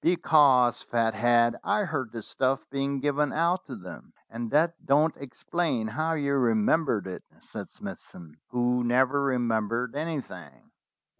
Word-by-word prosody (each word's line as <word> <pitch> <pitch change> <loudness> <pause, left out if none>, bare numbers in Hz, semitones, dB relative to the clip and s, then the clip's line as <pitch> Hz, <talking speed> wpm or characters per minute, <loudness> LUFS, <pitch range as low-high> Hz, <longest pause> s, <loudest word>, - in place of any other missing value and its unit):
"Because, 140 -8 +4
Fathead, 115 +1 +2
I 210 +1 +1
heard 145 - -3
the 115 -1 -7
stuff 135 +4 -1
being 140 0 -2
given 145 +1 0
out 170 +3 0
to 130 - -7
them." 90 -4 -11 0.2
"And 115 0 -5
that 165 +4 +1
don't 150 +3 +2
explain 140 -1 -2
how 155 +8 -1
you 140 -3 -1
remembered 115 +1 +2
it," 95 -1 -6 0.2
said - - -9
Smithson, 80 -4 -11
who 125 0 0
never 130 +4 +2
remembered 120 -2 -1
anything. 155 -2 -6
130 Hz, 135 wpm, -27 LUFS, 115-150 Hz, 0.2 s, Because